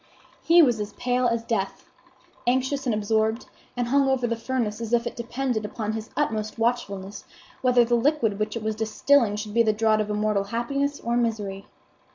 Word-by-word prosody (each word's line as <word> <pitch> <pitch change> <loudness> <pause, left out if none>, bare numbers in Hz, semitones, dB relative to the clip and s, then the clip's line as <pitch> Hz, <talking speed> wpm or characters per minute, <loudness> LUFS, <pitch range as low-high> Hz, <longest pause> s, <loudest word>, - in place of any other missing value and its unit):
He 340 +1 +6
was 225 -6 0
pale 250 0 0
as 230 -1 0
death, 210 -4 -2 0.6
anxious 260 +2 +1
and 230 - +2
absorbed, 220 +2 0 0.3
and 245 -1 0
hung 275 +1 +3
over 260 -2 +1
the 230 -1 0
furnace 230 -2 -2
as 230 0 -4
if 235 0 +3
it 240 - -4
depended 240 -1 -2
upon 215 +1 -4
his 220 0 -5
utmost 215 -7 -1
watchfulness 205 -4 -2 0.4
whether 250 -2 +4
the 240 - -1
liquid 235 -4 +2
which 215 +1 -2
it 225 - -6
was 220 0 -1
distilling 220 +1 +2
should 210 0 -5
be 235 - +4
the 220 -2 +3
draught 215 0 +2
of 210 - -3
immortal 210 -1 0
happiness 275 +6 -2
or 235 +1 -1
misery. 210 -5 -2
230 Hz, 185 wpm, -25 LUFS, 215-245 Hz, 0.6 s, He